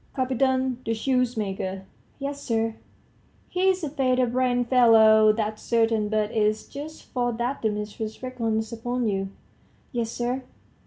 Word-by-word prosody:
"Kapiton, 260 0 +1
the 225 - -1
shoemaker." 215 -6 -1 0.3
"Yes, 280 0 -5
sir." 225 -3 0 0.8
"He's 375 0 +1
a 305 - -1
feather 255 -3 +2
brained 245 0 +1
fellow, 220 -3 +6
that's 215 0 -3
certain. 225 -2 +1
But 215 0 0
it's 215 -1 +1
just 300 +3 -8
for 245 -1 -1
that 240 +4 -2
the 220 - +2
mistress 210 +2 -5
reckons 225 -3 -2
upon 245 +1 -2
you." 195 -2 -1 0.6
"Yes, 235 -3 -2
sir." 245 +3 -2
235 Hz, 135 wpm, -25 LUFS, 220-255 Hz, 0.8 s, fellow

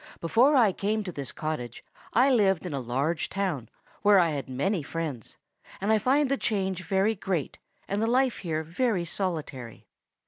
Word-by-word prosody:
Before 240 - +4
I 225 -6 +5
came 210 +3 -1
to 185 - -5
this 140 -5 -5
cottage 150 -7 -5 0.3
I 255 +5 +4
lived 195 -7 +3
in 175 - -4
a 140 - -1
large 135 +7 -1
town, 180 - -2 0.3
where 205 -1 +6
I 170 -3 +4
had 140 -3 -4
many 165 +9 0
friends, 150 -5 -5 0.4
and 205 +3 +1
I 215 - +4
find 275 +6 +3
the 275 +1 0
change 190 -5 -1
very 195 +3 +2
great, 185 -7 -3 0.3
and 200 +2 -1
the 225 - +1
life 255 +1 +2
here 160 -3 -2
very 180 +2 0
solitary. 155 - -4
190 Hz, 175 wpm, -27 LUFS, 155-215 Hz, 0.4 s, where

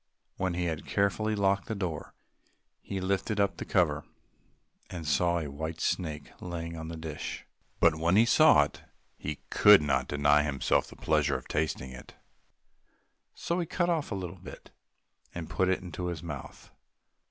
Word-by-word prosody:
When 95 -2 -1
he 90 0 -1
had 80 -3 -3
carefully 105 +2 +1
locked 100 -1 +1
the 110 - -3
door, 90 -7 -4 0.7
he 95 - -4
lifted 100 +3 -1
up 100 -1 +1
the - - -5
cover, 75 -6 +1 0.9
and 85 -3 -6
saw 85 +4 +2
a 80 -3 -3
white 80 +3 -5
snake 80 -5 -2
lying 85 -1 -5
on 80 0 -6
the 85 0 -6
dish. 80 -2 -6 0.3
But 85 - +5
when 85 +3 +1
he 110 +3 +6
saw 115 - +6
it - - -7 0.3
he 75 0 -6
could 105 -1 +8
not 65 -3 +1
deny 75 +1 +3
himself 70 -3 +1
the - - -13
pleasure - - +1
of - - -12
tasting 75 -4 -2
it, 65 - -12 1.2
so 170 +1 -2
he 170 - -2
cut 175 +2 0
off 160 -7 -1
a - - -1
little 90 -1 -6
bit - - -11 0.6
and 85 -2 -6
put 95 -1 +1
it 95 - +1
into 90 0 -5
his 85 -2 -4
mouth. 75 -5 -8
85 Hz, 170 wpm, -29 LUFS, 75-95 Hz, 1.2 s, could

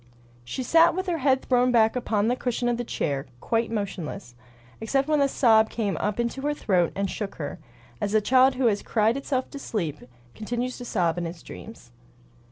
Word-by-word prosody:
She 190 - -4
sat 330 +6 +5
with 375 0 -2
her 345 -3 -1
head 265 -1 +2
thrown 250 0 +2
back 225 -1 +4
upon 220 -4 0
the 245 - +2
cushion 245 -1 -2
of 240 -1 +1
the 245 - -2
chair, 140 - -2
quite 230 - 0
motionless, 195 - -5 0.5
except 270 +5 0
when 305 -2 +2
a 280 - +4
sob 220 -5 +4
came 210 -4 -2
up 210 +2 -2
into 235 +3 -2
her 295 +1 -1
throat 180 - +1
and 200 0 -1
shook 200 +1 -5
her, 145 +2 -6 0.4
as 205 +1 -1
a - - +6
child 255 +4 +4
who 255 0 0
has 210 -3 +2
cried 220 +1 +1
itself 270 -1 -2
to 280 - -7
sleep 165 - -3 0.3
continues 240 +3 -3
to 245 - -7
sob 175 -6 0
in 175 - -2
its 165 0 -9
dreams. 220 - -11
230 Hz, 200 wpm, -25 LUFS, 200-255 Hz, 0.5 s, a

